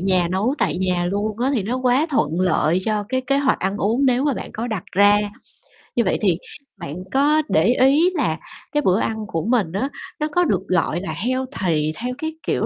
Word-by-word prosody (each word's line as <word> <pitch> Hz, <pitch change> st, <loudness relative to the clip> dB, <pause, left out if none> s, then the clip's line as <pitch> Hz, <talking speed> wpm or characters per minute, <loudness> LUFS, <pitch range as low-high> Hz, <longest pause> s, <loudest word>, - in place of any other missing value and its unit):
nhà, 185 Hz, -2 st, +2 dB
nấu 200 Hz, +9 st, 0 dB
tại 175 Hz, -, 0 dB
nhà 180 Hz, -2 st, 0 dB
luôn 205 Hz, +3 st, -2 dB
á 255 Hz, +3 st, +1 dB
thì 225 Hz, -, 0 dB
nó 230 Hz, +6 st, -2 dB
quá 255 Hz, +4 st, +2 dB
thuận 170 Hz, -, 0 dB
lợi 180 Hz, -2 st, +2 dB
cho 215 Hz, -2 st, 0 dB
cái 260 Hz, +1 st, 0 dB
kế 275 Hz, +2 st, +2 dB
hoạch 280 Hz, -1 st, +2 dB
ăn 195 Hz, +2 st, -1 dB
uống 230 Hz, +7 st, +1 dB
nếu 255 Hz, +1 st, +2 dB
mà 285 Hz, -4 st, +1 dB
bạn -, -, -6 dB
có 225 Hz, +2 st, -4 dB
đặt 215 Hz, -7 st, -4 dB
ra. 205 Hz, +2 st, +5 dB, 0.8 s
Như 235 Hz, -, +3 dB
vậy 185 Hz, -, +1 dB
thì 185 Hz, -6 st, +2 dB, 0.4 s
bạn 170 Hz, -5 st, -7 dB, 0.2 s
có 295 Hz, +3 st, +4 dB
để 160 Hz, -, +3 dB
ý 270 Hz, -, +4 dB
là 250 Hz, -, 0 dB, 0.3 s
cái 295 Hz, -, +1 dB
bữa 190 Hz, -4 st, +2 dB
ăn 220 Hz, -1 st, -2 dB
của 165 Hz, -4 st, -3 dB
mình 225 Hz, -8 st, +1 dB
á 205 Hz, +10 st, -1 dB, 0.3 s
nó 300 Hz, -, 0 dB
có 355 Hz, +3 st, +3 dB
được, 200 Hz, -, +1 dB
gọi 175 Hz, -1 st, 0 dB
là, 195 Hz, -, -4 dB
healthy 200 Hz, -, -1 dB
theo, 245 Hz, +2 st, -3 dB
cái, 315 Hz, 0 st, -4 dB
kiểu, -, -, +1 dB
215 Hz, 220 wpm, -21 LUFS, 185-260 Hz, 0.8 s, ra